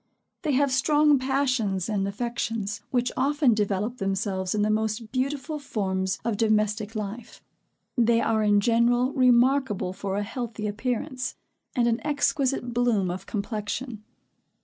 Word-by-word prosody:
They 305 Hz, -5 st, 0 dB
have 280 Hz, +1 st, +2 dB
strong 295 Hz, +2 st, +4 dB
passions 255 Hz, -8 st, 0 dB
and 200 Hz, -3 st, 0 dB
affections, 225 Hz, 0 st, -3 dB
which 245 Hz, -1 st, 0 dB
often 280 Hz, -1 st, +3 dB
develope 210 Hz, +3 st, -1 dB
themselves 195 Hz, -1 st, -1 dB
in 205 Hz, -, +1 dB
the 215 Hz, -, +2 dB
most 220 Hz, +1 st, -1 dB
beautiful 275 Hz, +3 st, -2 dB
forms 190 Hz, -8 st, -2 dB
of 230 Hz, -3 st, 0 dB
domestic 215 Hz, 0 st, +1 dB
life. 215 Hz, +2 st, -6 dB, 0.5 s
They 235 Hz, -1 st, +3 dB
are 220 Hz, -1 st, +1 dB
in 205 Hz, -1 st, +4 dB
general 240 Hz, +3 st, +2 dB
remarkable 250 Hz, -6 st, +3 dB
for 195 Hz, 0 st, -3 dB
a 205 Hz, -, 0 dB
healthy 230 Hz, -1 st, -5 dB
appearance, 250 Hz, +5 st, -3 dB, 0.4 s
and 240 Hz, -2 st, +3 dB
an 230 Hz, 0 st, +1 dB
exquisite 275 Hz, -4 st, 0 dB
bloom 230 Hz, -7 st, +1 dB
of 180 Hz, -, -7 dB
complexion. 215 Hz, +2 st, -4 dB
230 Hz, 135 wpm, -26 LUFS, 205-255 Hz, 0.5 s, strong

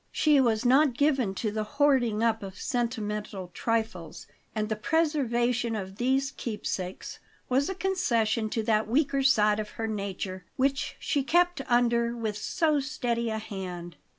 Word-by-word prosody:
She 295 Hz, -3 st, +4 dB
was 230 Hz, -2 st, +1 dB
not 265 Hz, 0 st, +4 dB
given 265 Hz, -9 st, +2 dB
to 215 Hz, +2 st, -2 dB
the 215 Hz, 0 st, -2 dB
hoarding 250 Hz, -7 st, +3 dB
up 225 Hz, -1 st, +2 dB
of 190 Hz, -2 st, -8 dB
sentimental 210 Hz, -6 st, -3 dB
trifles; 220 Hz, -7 st, -2 dB, 0.3 s
and 215 Hz, -1 st, -1 dB
the 215 Hz, -, -1 dB
preservation 245 Hz, -4 st, +1 dB
of 190 Hz, -2 st, -6 dB
these 265 Hz, +3 st, +1 dB
keepsakes 200 Hz, -7 st, -5 dB, 0.3 s
was 270 Hz, +5 st, +2 dB
a 385 Hz, -, -3 dB
concession 235 Hz, -, 0 dB
to 225 Hz, 0 st, -1 dB
that 215 Hz, -1 st, +1 dB
weaker 275 Hz, +3 st, +1 dB
side 215 Hz, -6 st, +4 dB
of 210 Hz, -1 st, -4 dB
her 225 Hz, -, -2 dB
nature 195 Hz, -3 st, -4 dB
which 275 Hz, +1 st, 0 dB
she 285 Hz, -, 0 dB
kept 350 Hz, +3 st, +2 dB
under 235 Hz, -1 st, +2 dB
with 220 Hz, -3 st, -2 dB
so 305 Hz, -, +1 dB
steady 245 Hz, -5 st, -2 dB
a 220 Hz, -, -2 dB
hand. 180 Hz, -5 st, -6 dB
235 Hz, 150 wpm, -28 LUFS, 215-270 Hz, 0.3 s, She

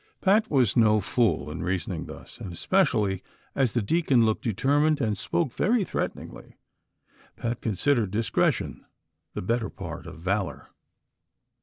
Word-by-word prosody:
Pat 210 Hz, +3 st, +3 dB
was 130 Hz, -8 st, +3 dB
no 110 Hz, -2 st, +5 dB
fool 95 Hz, -7 st, 0 dB
in 75 Hz, -, -5 dB
reasoning 90 Hz, 0 st, -2 dB
thus -, -, -11 dB
•, -, -, -16 dB
and 95 Hz, -, -6 dB
especially 105 Hz, -, +1 dB, 0.3 s
as 130 Hz, -4 st, +1 dB
the 120 Hz, -, +1 dB
deacon 135 Hz, -3 st, +3 dB
looked 110 Hz, -1 st, 0 dB
determined 145 Hz, +7 st, +2 dB
and 110 Hz, -6 st, 0 dB
spoke 140 Hz, -, -1 dB
very 220 Hz, -1 st, +2 dB
theateningly, -, -, -5 dB, 0.8 s
Pat 120 Hz, 0 st, -3 dB
considered 115 Hz, +1 st, +1 dB
discretion 110 Hz, +3 st, 0 dB, 0.5 s
the -, -, -3 dB
better 115 Hz, +2 st, 0 dB
part -, -, -8 dB
of -, -, -9 dB
valor. 95 Hz, +2 st, -2 dB
115 Hz, 140 wpm, -26 LUFS, 100-145 Hz, 0.8 s, no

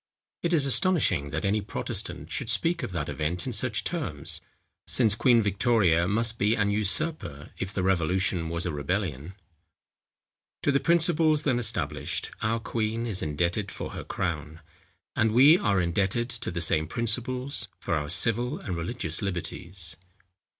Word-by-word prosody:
It 170 Hz, -, -1 dB
is 155 Hz, -5 st, +3 dB
astonishing, 135 Hz, -, +3 dB
that 80 Hz, +5 st, -3 dB
any 105 Hz, +2 st, +1 dB
Protestant 100 Hz, -, -5 dB
should -, -, -2 dB
speak 170 Hz, +1 st, +1 dB
of -, -, -4 dB
that 80 Hz, -5 st, -3 dB
event 80 Hz, +3 st, -2 dB
in 130 Hz, -, -3 dB
such 110 Hz, -1 st, +1 dB
terms; 90 Hz, -, -3 dB, 0.5 s
since 110 Hz, -5 st, +3 dB
Queen 120 Hz, 0 st, +4 dB
Victoria 100 Hz, -5 st, +2 dB
must 110 Hz, +3 st, 0 dB
be 105 Hz, +3 st, +3 dB
an 100 Hz, -2 st, +1 dB
usurper, 105 Hz, -, -1 dB
if 95 Hz, -, -3 dB
the 95 Hz, -2 st, -2 dB
revolution 90 Hz, -1 st, +1 dB
was 85 Hz, +1 st, -3 dB
a 90 Hz, -, -1 dB
rebellion. 80 Hz, +1 st, -3 dB, 1.3 s
To 145 Hz, -, +3 dB
the 140 Hz, -, +3 dB
principles 160 Hz, -2 st, +3 dB
then 130 Hz, -4 st, +1 dB
established, 105 Hz, -, -1 dB
our 115 Hz, +2 st, 0 dB
queen 115 Hz, 0 st, -2 dB
is 105 Hz, -5 st, -1 dB
indebted 85 Hz, +7 st, -1 dB
for -, -, -6 dB
her -, -, -6 dB
crown; 80 Hz, -3 st, -4 dB, 0.5 s
and 110 Hz, -1 st, +2 dB
we 145 Hz, +8 st, +7 dB
are 100 Hz, -3 st, +2 dB
indebted 95 Hz, +7 st, 0 dB
to 115 Hz, -1 st, -3 dB
the 85 Hz, 0 st, -3 dB
same 80 Hz, -1 st, +1 dB
principles, 125 Hz, -, -1 dB
for -, -, -3 dB
our 75 Hz, -2 st, -1 dB
civil 120 Hz, -, +1 dB
and 95 Hz, -, -5 dB
religious 85 Hz, -1 st, -2 dB
liberties. 90 Hz, -2 st, -3 dB
100 Hz, 155 wpm, -27 LUFS, 85-120 Hz, 1.3 s, we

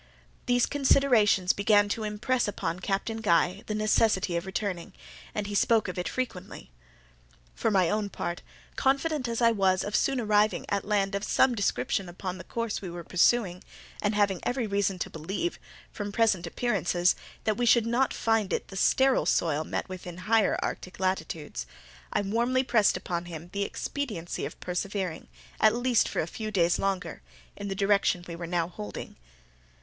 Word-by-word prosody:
These 245 Hz, -1 st, +3 dB
considerations 245 Hz, -9 st, +3 dB
began 205 Hz, 0 st, +4 dB
to 220 Hz, +2 st, -2 dB
impress 215 Hz, +4 st, 0 dB
upon 180 Hz, -3 st, -3 dB
Captain 200 Hz, +4 st, -2 dB
Guy 185 Hz, -2 st, +2 dB
the 215 Hz, -, -2 dB
necessity 215 Hz, -4 st, +2 dB
of 170 Hz, +2 st, -2 dB
returning, 190 Hz, -3 st, -3 dB, 0.4 s
and 210 Hz, -, -1 dB
he 205 Hz, -, -5 dB
spoke 220 Hz, +1 st, +3 dB
of 180 Hz, 0 st, -4 dB
it 180 Hz, -, -2 dB
frequently. 195 Hz, -, -5 dB, 0.8 s
For -, -, 0 dB
my 190 Hz, -4 st, +3 dB
own 210 Hz, +3 st, 0 dB
part, 175 Hz, -2 st, -4 dB, 0.3 s
confident 275 Hz, 0 st, +1 dB
as 235 Hz, +1 st, -1 dB
I 230 Hz, -, +6 dB
was 190 Hz, -3 st, +2 dB
of 205 Hz, -, -3 dB
soon 270 Hz, -2 st, +2 dB
arriving 215 Hz, -1 st, +2 dB
at 200 Hz, -1 st, -1 dB
land 200 Hz, -1 st, +1 dB
of 200 Hz, 0 st, -2 dB
some 260 Hz, +3 st, +3 dB
description 200 Hz, -3 st, -1 dB
upon 185 Hz, +1 st, -5 dB
the -, -, -7 dB
course 230 Hz, -2 st, -3 dB
we 190 Hz, -, -6 dB
were 170 Hz, 0 st, -7 dB
pursuing, 180 Hz, +1 st, +2 dB, 0.4 s
and 205 Hz, 0 st, 0 dB
having 200 Hz, -3 st, +2 dB
every 245 Hz, -1 st, -1 dB
reason 200 Hz, -2 st, 0 dB
to -, -, -4 dB
believe, 195 Hz, -, -3 dB, 0.3 s
from 205 Hz, -1 st, -5 dB
present 205 Hz, -5 st, +2 dB
appearances, 180 Hz, -4 st, +1 dB, 0.3 s
that 215 Hz, -1 st, 0 dB
we 245 Hz, -, +1 dB
should 235 Hz, -1 st, +5 dB
not 240 Hz, +3 st, +1 dB
find 225 Hz, -3 st, +1 dB
it -, -, -2 dB
the 195 Hz, -, -9 dB
sterile 265 Hz, +6 st, +3 dB
soil 155 Hz, -2 st, +1 dB
met -, -, -3 dB
with 185 Hz, -1 st, -8 dB
in 175 Hz, -, -6 dB
the 180 Hz, -, -10 dB
higher 220 Hz, 0 st, +3 dB
Arctic 185 Hz, -, -5 dB
latitudes, 160 Hz, -, -2 dB, 0.4 s
I -, -, +1 dB
warmly 235 Hz, +6 st, +1 dB
pressed 225 Hz, -7 st, +3 dB
upon 175 Hz, -1 st, -4 dB
him 170 Hz, 0 st, -9 dB
the 200 Hz, -, -2 dB
expediency 205 Hz, -5 st, -3 dB
of -, -, -8 dB
persevering, 185 Hz, -1 st, -3 dB, 0.3 s
at 215 Hz, +1 st, +5 dB
least 245 Hz, -1 st, +2 dB
for -, -, -1 dB
a -, -, -2 dB
few 215 Hz, +6 st, -5 dB
days 175 Hz, -4 st, +2 dB
longer, 195 Hz, -2 st, -2 dB, 0.3 s
in 205 Hz, -, -6 dB
the 195 Hz, -, -3 dB
direction 195 Hz, -3 st, +2 dB
we 170 Hz, -, -6 dB
were 170 Hz, 0 st, -6 dB
now 170 Hz, -1 st, 0 dB
holding. 105 Hz, -, -8 dB
200 Hz, 175 wpm, -28 LUFS, 180-225 Hz, 0.8 s, I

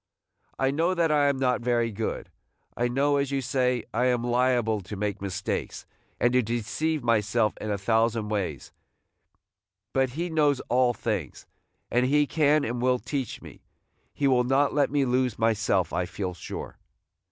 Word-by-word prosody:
I 135 Hz, 0 st, +1 dB
know 165 Hz, +6 st, +1 dB
that 165 Hz, -2 st, +2 dB
I 145 Hz, -1 st, +3 dB
am 140 Hz, -1 st, +1 dB
not 125 Hz, -2 st, +1 dB
very 120 Hz, -1 st, +1 dB
good. 110 Hz, +2 st, -4 dB, 0.4 s
I 120 Hz, -, +1 dB
know, 140 Hz, +4 st, +1 dB
as 140 Hz, -1 st, 0 dB
you 140 Hz, -1 st, 0 dB
say, 125 Hz, -2 st, 0 dB
I 125 Hz, +3 st, +1 dB
am 125 Hz, -2 st, +1 dB
liable 120 Hz, -3 st, +1 dB
to 95 Hz, +3 st, -8 dB
make 100 Hz, 0 st, -3 dB
mistakes, 95 Hz, 0 st, -4 dB, 0.3 s
and 120 Hz, 0 st, +2 dB
to 125 Hz, -, +4 dB
deceive 120 Hz, +7 st, -2 dB
myself 110 Hz, -1 st, +2 dB
in 110 Hz, -, -4 dB
a 100 Hz, -, 0 dB
thousand 110 Hz, +1 st, +1 dB
ways; 95 Hz, -, -3 dB, 1.2 s
but 130 Hz, -2 st, +1 dB
He 175 Hz, +1 st, -1 dB
knows 150 Hz, -4 st, +2 dB
all 125 Hz, -1 st, +3 dB
things, 100 Hz, -, -4 dB, 0.5 s
and 125 Hz, +1 st, +2 dB
he 145 Hz, +2 st, +3 dB
can 150 Hz, 0 st, +2 dB
and 120 Hz, +1 st, -3 dB
will 125 Hz, 0 st, +3 dB
teach 135 Hz, -1 st, -4 dB
me; -, -, -12 dB, 0.5 s
he 140 Hz, -, 0 dB
will 125 Hz, -2 st, +3 dB
not 135 Hz, +3 st, +2 dB
let 145 Hz, -1 st, +2 dB
me 140 Hz, -1 st, +1 dB
lose 125 Hz, -2 st, 0 dB
myself, 105 Hz, -6 st, +1 dB
I 90 Hz, -, -1 dB
feel 90 Hz, 0 st, -4 dB
sure." 85 Hz, -, -8 dB
125 Hz, 170 wpm, -26 LUFS, 110-140 Hz, 1.2 s, to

